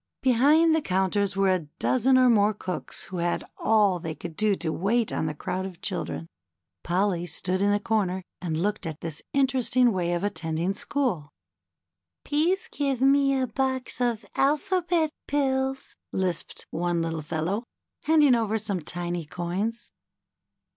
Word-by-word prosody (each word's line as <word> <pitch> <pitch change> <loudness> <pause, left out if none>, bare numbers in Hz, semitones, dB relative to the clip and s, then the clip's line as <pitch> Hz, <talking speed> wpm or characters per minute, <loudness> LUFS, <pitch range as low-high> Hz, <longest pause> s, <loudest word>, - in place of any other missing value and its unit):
Behind 290 +6 +5
the 320 - +1
counters 190 -1 0
were 195 0 +3
a 170 -5 -2
dozen 260 +1 +3
or 255 0 +6
more 215 -3 +4
cooks 185 -2 -5
who 185 - -7
had 175 0 0 0.2
all 205 -5 +3
they 165 -2 -5
could 170 -2 -8
do 210 +1 +2
to 165 -3 -3
wait 220 +5 0
on 160 - -1
the 155 - -3
crowd 185 +5 -3
of 190 -3 -7
children. 80 -1 -3 0.6
Polly 175 0 0
stood 185 +3 -1
in 200 0 +3
a 205 - +2
corner 195 -4 0 0.2
and 160 -3 -2
looked 200 -1 -1
at 160 -1 -6
this 160 -3 -5
interesting 255 -3 +3
way 175 -3 0
of 175 +2 -1
attend 160 -5 -2
ing 175 +4 0
school. 200 - -2 1.0
^^Peese 335 +6 +1
give 275 -3 -1
me 275 0 +4
a 260 - +1
box 260 +1 -2
of 235 -3 0
Alphabet 325 +3 +1 0.2
Pills,'' 270 -1 -1 0.2
lisped 185 -3 -2
one 170 0 0
little 165 -1 -3
fellow, 165 +8 -2 0.4
handing 305 -4 +5
over 220 -2 +1
some 200 -4 -3
tiny 175 +2 -3
coins. 185 +7 -3
205 Hz, 155 wpm, -26 LUFS, 175-260 Hz, 1.0 s, or